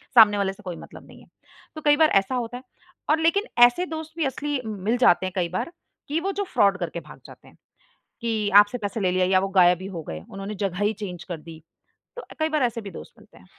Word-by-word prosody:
सामने 210 -3 +8
वाले 195 -1 0
से 210 - -18
कोई 180 -3 -5
मतलब - - -13
नहीं - - -15
है, - - -19 0.5
तो 310 - -7
कई 295 0 +6
बार 315 -1 +5
ऐसा 255 +6 -5
होता 245 0 -3
है। 255 - -12 0.5
और 310 +1 +3
लेकिन 335 +6 +2 0.2
ऐसे 245 +10 +1
दोस्त 315 -1 -7
भी 320 - 0
असली 285 0 -2
मिल 215 +3 -1
जाते 190 -6 +4
हैं 185 - -4
कई 175 -2 0
बार 185 - -3 0.4
कि 305 +3 -1
वो 390 +3 -2
जो 405 +1 -2
फ्रॉड 200 -1 +3
करके 175 -1 -4
भाग 155 - -14
जाते - - -15
हैं - - -20 0.6
कि 220 -3 -1
आपसे 205 +4 +6
पैसे 205 0 -4
ले 185 -2 +1
लिया 185 0 +1
या 185 0 +3
वो 195 - -2
गायब 175 0 +5
ही - - -6
हो 165 - -5
गए 80 0 -6
उन्होंने 195 +2 -6
जगह 180 -2 -2
ही 210 - +2
चेंज 180 -4 -7
कर 175 - -5
दी। 160 0 -12 0.5
तो 485 - -8
कई 315 0 +1
बार 305 -3 +1
ऐसे 235 -2 -1
भी 200 - -8
दोस्त - - -11
मिलते - - -20
हैं। 90 - -18
210 Hz, 250 wpm, -24 LUFS, 185-290 Hz, 0.6 s, सामने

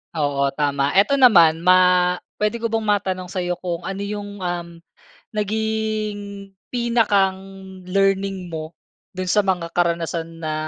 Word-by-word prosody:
Oo, 140 -2 0
tama. 140 -1 0
Eto 200 +9 +4
naman 170 -11 +5
ma 180 +1 +6 0.6
pwede 210 +2 -1
ko 230 - -1
bang 225 0 -1
matanong 190 -3 -1
sa'yo 180 -2 -2
kung 175 -1 -5
ano 195 +1 -4
yung, 205 -1 -6
um, 175 -1 -3 0.7
naging 215 -1 -3 0.2
pinakang 195 -5 0
learning 195 0 0
mo 160 -1 -6 0.4
do'n 185 0 -5
sa 210 +3 +3
mga 180 -3 -1
karanasan 170 -1 -1
na 155 -1 -3
190 Hz, 130 wpm, -21 LUFS, 170-205 Hz, 0.7 s, ma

